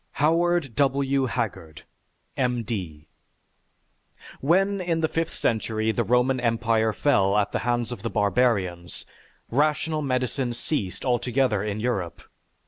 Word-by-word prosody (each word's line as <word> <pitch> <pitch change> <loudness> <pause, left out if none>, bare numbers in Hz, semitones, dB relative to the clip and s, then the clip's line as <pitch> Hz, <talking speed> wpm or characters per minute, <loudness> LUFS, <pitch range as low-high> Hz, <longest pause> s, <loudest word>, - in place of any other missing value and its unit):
HOWARD 165 -3 +1
W. 135 0 +1
HAGGARD, 100 - -4 0.5
M. 125 -2 0
D. 90 -10 -5 1.3
When 195 +6 +2
in 165 -2 -1
the 160 - +2
fifth 165 +1 -2
century 110 -1 0
the 120 - 0
Roman 125 +2 +2
Empire 115 -2 +1
fell 105 -6 +2
at 105 -1 +1
the - - -1
hands 120 0 -1
of 120 - -6
the 115 - -3
barbarians, 100 -6 0 0.5
rational 155 +3 +1
medicine 130 -2 -1
ceased 100 - -3
altogether 125 -3 +1
in 105 0 -3
Europe. 100 -8 -2
120 Hz, 125 wpm, -25 LUFS, 110-140 Hz, 1.3 s, When